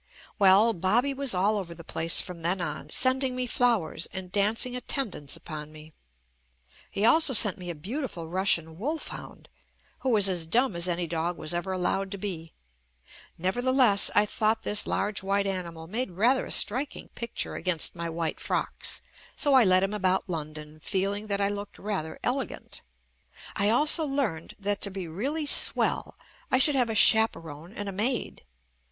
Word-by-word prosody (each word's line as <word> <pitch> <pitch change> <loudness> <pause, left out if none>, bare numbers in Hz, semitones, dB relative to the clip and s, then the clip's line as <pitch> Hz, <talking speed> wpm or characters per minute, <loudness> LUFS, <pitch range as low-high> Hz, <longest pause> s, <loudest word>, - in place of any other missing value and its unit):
Well, 200 +4 +6
Bobby 225 +10 +1
was 275 -6 -1
all 205 +3 +1
over 170 -3 -7
the 170 - -12
place 165 +1 +2
from 180 -3 -9
then 175 +3 0
on, 175 - -5
sending 260 0 +1
me 255 0 -2
flowers 230 -10 0
and 185 -1 -7
dancing 215 +5 +1
attendance 235 - -3
upon 155 -2 -8
me. 155 0 -13 1.0
He 200 - -1
also 315 +3 +5
sent 210 -4 +5
me 180 -1 -7
a 170 - -4
beautiful 195 - -6
Rus 190 +4 -1
sian 160 0 0
wolfhound, 300 +8 -6 0.5
who 265 - -2
was 210 -5 +5
as 175 -4 0
dumb 240 +3 +1
as 170 +1 +2
any 175 0 -1
dog 170 +1 -3
was 155 +1 -3
ever 175 +2 -3
allowed 190 +1 -1
to - - -5
be. 175 -5 -6 0.9
Nevertheless, 240 +3 +3
I 210 - +5
thought 215 +1 0
this 210 0 +1
large 210 -1 -1
white 200 +1 0
animal 170 -4 -4
made 225 +8 -3
rather 230 +9 +1
a - - -10
strik 260 +6 +3
ing - - -11
picture 235 -1 -6
against 180 -3 -1
my 170 -1 -4
white 165 -1 -3
frocks, - - -2 0.3
so 285 - +3
I 260 -2 +7
led 185 -2 +4
him 195 +2 -1
about 190 -2 0
London 155 -2 -7
feeling 200 +5 -2
that 200 -1 -1
I 200 0 +1
looked 205 0 -6
rather 190 -6 -4
elegant. 260 +2 -4 0.7
I 200 +1 +2
also 300 +7 +4
learned 260 - -2
that 205 0 -2
to 200 - 0
be 190 -2 -6
really 275 - -3
"swell" 285 - +3 0.3
I - - +3
should 290 +3 +2
have 250 -4 +2
a 220 - -2
chaperone 170 -8 +2
and 205 -1 -6
a - - -3
maid. 225 +6 -2
200 Hz, 175 wpm, -27 LUFS, 170-235 Hz, 1.0 s, I